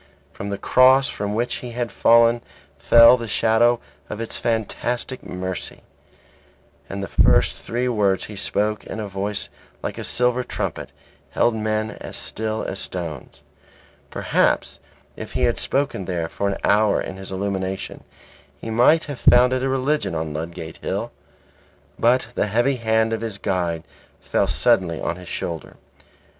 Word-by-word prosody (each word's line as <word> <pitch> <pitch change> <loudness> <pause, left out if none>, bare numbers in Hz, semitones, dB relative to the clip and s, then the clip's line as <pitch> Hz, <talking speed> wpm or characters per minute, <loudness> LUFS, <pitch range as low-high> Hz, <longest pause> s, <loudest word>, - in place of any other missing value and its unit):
From 100 - -6
the 100 - -3
Cross 130 +5 +5
from 105 0 -3
which 120 +2 -1
he 120 -1 -8
had 120 -2 -3
fallen 115 +2 +4 0.4
fell 115 +9 +7
the 115 -1 -6
shadow 115 +3 +3 0.3
of 105 - -5
its 115 - -4
fantastic 120 +3 -2
mercy; 90 0 -6 1.1
and 100 +1 -4
the - - -4
first - - +3
three 120 +2 -2
words 100 -5 +1
he 105 - -9
spoke 105 +2 -1
in - - -7
a 105 - -4
voice 100 +1 -3 0.3
like - - -4
a - - -4
silver 125 0 +1
trumpet, 70 - -4 0.4
held 120 - +2
men 110 0 -1
as - - -8
still 110 0 -3
as 95 - -4
stones. 80 -6 -6 0.7
Perhaps - - 0 0.4
if - - -8
he - - -1
had - - +2
spoken 135 -9 -1
there 85 -3 -2
for 100 - -2
an 100 - -2
hour 105 0 +3
in 95 - -5
his 95 0 -7
illumination 95 0 -3 0.6
he 115 - -6
might 125 +8 +4
have 145 -4 -6
founded 125 +1 +5
a 135 - 0
religion 135 - 0
on 80 -1 -3
Ludgate 80 +1 -6
Hill. - - -3 0.9
But 120 +1 +3
the - - 0
heavy 120 +6 +1
hand 110 -1 +1
of 110 - -2
his 110 -3 -4
guide 90 -5 -1 0.4
fell - - 0
suddenly 85 -3 +2
on 85 - -2
his 90 -1 -10
shoulder. 85 -2 -5
110 Hz, 155 wpm, -22 LUFS, 95-120 Hz, 1.1 s, fell